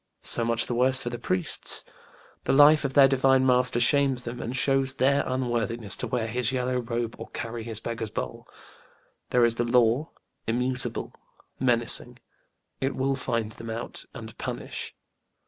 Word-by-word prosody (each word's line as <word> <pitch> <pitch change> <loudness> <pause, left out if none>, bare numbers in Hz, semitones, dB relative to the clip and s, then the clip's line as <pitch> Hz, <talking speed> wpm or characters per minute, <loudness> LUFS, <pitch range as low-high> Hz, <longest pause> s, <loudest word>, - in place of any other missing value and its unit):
So 120 - +2
much 115 0 +1
the - - -3
worse 130 +2 +3
for 120 - -4
the 120 - -5
priests: 90 -7 -2 0.6
the - - +2
life 145 +2 +7
of 135 -1 -3
their 140 -2 +8
Divine 135 0 +3
Master 125 -1 +3
shames 135 0 +3
them 120 0 -6
and 120 +3 -4
shows 135 0 +2
their 140 +2 +3
unworthiness 120 -4 -1
to - - -3
wear 120 -3 -1
his 120 +1 0
yellow 125 -1 -1
robe 120 -1 -3
or - - -7
carry 115 -1 -5
his 110 -1 -4
beggar's 115 -1 -4
bowl. - - -5 0.8
There 125 -1 +4
is 115 0 +1
the 120 - +1
Law 120 +4 +2 0.4
immutable 125 +2 -2 0.5
menacing; 120 -3 0 0.6
it 135 +1 -1
will 135 +1 0
find 115 -4 -2
them 115 +1 -9
out 115 +2 -5
and 110 -3 -9
punish. - - -5
120 Hz, 165 wpm, -26 LUFS, 115-130 Hz, 0.8 s, their